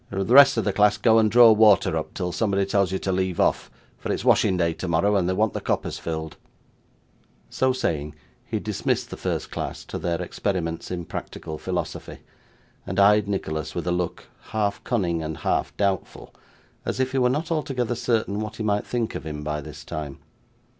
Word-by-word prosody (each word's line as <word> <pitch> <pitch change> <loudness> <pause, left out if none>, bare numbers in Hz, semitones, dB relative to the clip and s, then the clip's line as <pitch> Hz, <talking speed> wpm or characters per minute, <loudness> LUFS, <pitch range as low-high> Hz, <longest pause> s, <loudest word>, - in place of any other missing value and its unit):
The 95 -1 -2
rest 135 +3 +7
of 115 - +1
the 100 - 0
class 105 0 +4
go 110 +2 +4
and 110 -1 +3
draw 115 +1 +8
water 105 -6 +5
up, 80 - -4
till 90 -2 -2
somebody 100 -1 0
tells 100 -1 +1
you 95 - 0
to 95 - -2
leave 95 -1 -1
off, - - +1 0.3
for - - -3
it's - - -3
washing 95 - +4
day 85 -2 +1
tomorrow, 90 +4 +1
and 90 -2 +1
they - - +1
want 105 +2 +1
the - - -4
coppers - - -2
filled.' 80 -1 -5 1.1
So 130 0 +2
saying, 75 - -2 0.3
he - - -3
dismissed - - -2
the - - -4
first - - -3
class - - -5
to - - -6
their 85 -2 -1
experiments 85 -4 -3
in 90 -2 -4
practical 80 -1 -7
philosophy, - - -4 0.7
and 95 +2 -3
eyed 105 +1 +5
Nicholas 80 -6 -3
with 85 - -3
a 90 - 0
look, 90 -1 -2 0.2
half 105 -2 -2
cunning 90 -9 0
and 80 0 -4
half - - -1
doubtful, 100 -2 -2 0.5
as - - -3
if 130 0 0
he 135 - 0
were 125 -1 +3
not 155 +6 -2
altogether 130 -6 -1
certain 110 -4 -1
what 110 0 -5
he 110 - -5
might 105 -1 0
think 120 -2 -2
of - - -5
him 75 -1 -5
by 75 0 -3
this - - -10
time. 75 -3 -6
100 Hz, 195 wpm, -24 LUFS, 85-110 Hz, 1.1 s, draw